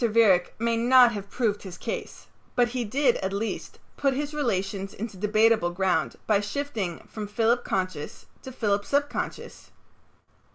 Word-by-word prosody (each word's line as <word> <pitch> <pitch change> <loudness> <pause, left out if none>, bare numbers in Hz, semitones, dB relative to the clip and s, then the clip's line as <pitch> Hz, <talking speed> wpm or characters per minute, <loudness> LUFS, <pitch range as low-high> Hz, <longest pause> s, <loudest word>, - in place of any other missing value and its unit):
Viereck 210 -6 +4
may 230 0 0
not 245 +1 +6
have 200 -3 -6
proved 215 -4 0
his 185 -3 -9
case, - - -6 0.3
but 240 -1 +3
he 250 0 -2
did, 250 +3 +2
at 190 - -3
least, 205 +3 -4 0.2
put 275 -2 +1
his 290 +2 -3
relations 195 -8 -2
into 215 0 -6
debatable 215 0 +3
ground 185 +1 0
by 210 -2 +3
shifting 205 - -4
from 215 -2 -6
Philip 230 +3 +1
conscious 185 -6 -3 0.2
to 260 - -8
Philip 205 -5 0
subconscious. 285 +5 -3
220 Hz, 150 wpm, -26 LUFS, 195-245 Hz, 0.3 s, not